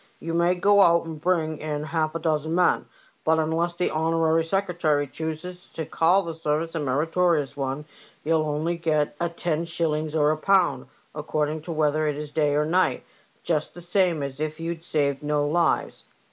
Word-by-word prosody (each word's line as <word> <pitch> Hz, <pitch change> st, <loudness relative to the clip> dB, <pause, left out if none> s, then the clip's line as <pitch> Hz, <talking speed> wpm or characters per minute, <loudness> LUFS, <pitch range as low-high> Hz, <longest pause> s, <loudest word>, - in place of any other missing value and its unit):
You 165 Hz, 0 st, -5 dB
may 170 Hz, +2 st, +3 dB
go 200 Hz, +3 st, +4 dB
out 170 Hz, -2 st, +5 dB
and 160 Hz, -2 st, -7 dB
bring 160 Hz, -3 st, 0 dB
in 150 Hz, -1 st, -3 dB
half 155 Hz, 0 st, -1 dB
a -, -, -1 dB
dozen 160 Hz, 0 st, 0 dB
men, 180 Hz, 0 st, +2 dB, 0.4 s
but 160 Hz, 0 st, +3 dB
unless 165 Hz, +2 st, 0 dB
the 180 Hz, +1 st, 0 dB
honorary 160 Hz, 0 st, +2 dB
secretary 165 Hz, -5 st, 0 dB
chooses 160 Hz, +5 st, -6 dB
to 160 Hz, -, -4 dB
call 175 Hz, +6 st, +3 dB
the 165 Hz, -2 st, -5 dB
service 160 Hz, +1 st, -2 dB
a 165 Hz, -, -2 dB
meritorious 150 Hz, +1 st, +1 dB
one, 135 Hz, +1 st, -3 dB, 0.4 s
you'll 160 Hz, +1 st, +2 dB
only 155 Hz, +3 st, -1 dB
get 155 Hz, -4 st, 0 dB
a 170 Hz, 0 st, 0 dB
ten 170 Hz, -1 st, -2 dB
shillings 160 Hz, -2 st, -1 dB
or 150 Hz, -1 st, +3 dB
a 155 Hz, -, -1 dB
pound, 190 Hz, +2 st, +2 dB, 0.3 s
according 150 Hz, 0 st, -2 dB
whether 155 Hz, 0 st, +1 dB
it 150 Hz, -, 0 dB
is 150 Hz, 0 st, -6 dB
day 150 Hz, -2 st, +1 dB
or 150 Hz, +1 st, +2 dB
night, 180 Hz, +4 st, +1 dB, 0.4 s
just 155 Hz, -3 st, -1 dB
the -, -, -9 dB
same 175 Hz, -3 st, +1 dB
as 140 Hz, 0 st, -6 dB
if 155 Hz, +1 st, -3 dB
you'd 165 Hz, 0 st, -4 dB
saved 140 Hz, -4 st, 0 dB
no 150 Hz, 0 st, 0 dB
lives." 170 Hz, +2 st, 0 dB
160 Hz, 180 wpm, -25 LUFS, 150-170 Hz, 0.4 s, out